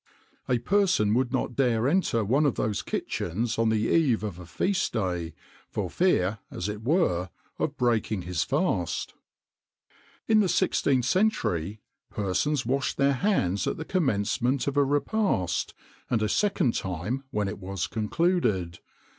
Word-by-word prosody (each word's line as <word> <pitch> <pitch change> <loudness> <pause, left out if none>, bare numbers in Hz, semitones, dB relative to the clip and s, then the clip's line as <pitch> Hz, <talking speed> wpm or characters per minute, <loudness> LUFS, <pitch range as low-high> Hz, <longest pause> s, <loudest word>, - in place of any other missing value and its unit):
A 125 - +3
person 180 - +2
would 125 +1 +1
not 130 -2 -1
dare 120 -3 +2
enter 140 - +1
one 140 +8 +3
of 135 - 0
those 105 -2 -1
kitchens 110 +7 -2
on 115 -1 +3
the 110 -1 +1
eve 130 -4 +2
of 100 -5 -5
a 90 - -10
feast 190 - -1
day, 90 -6 -2 0.3
for 95 -5 -3
fear, 110 - +2
as 90 - -4
it 105 0 -5
were, 110 - +1 0.3
of 145 -1 -2
breaking 110 -5 0
his 90 -2 -1
fast. 85 -2 -1 1.1
"In 220 -1 +5
the 205 - +3
16th 135 -6 +2
century 110 - 0 0.3
persons 105 - -1
washed 130 +2 -1
their 140 0 +3
hands 125 - 0
at - - -1
the 160 - -5
commencement 130 - 0
of 140 - -2
a 145 - +4
repast, 145 - 0 0.3
and 115 -3 +1
a - - +2
second 195 - +1
time 95 +9 -3
when 105 -4 -1
it 100 - -5
was 95 -1 -3
concluded. 105 - 0
115 Hz, 150 wpm, -27 LUFS, 100-145 Hz, 1.1 s, In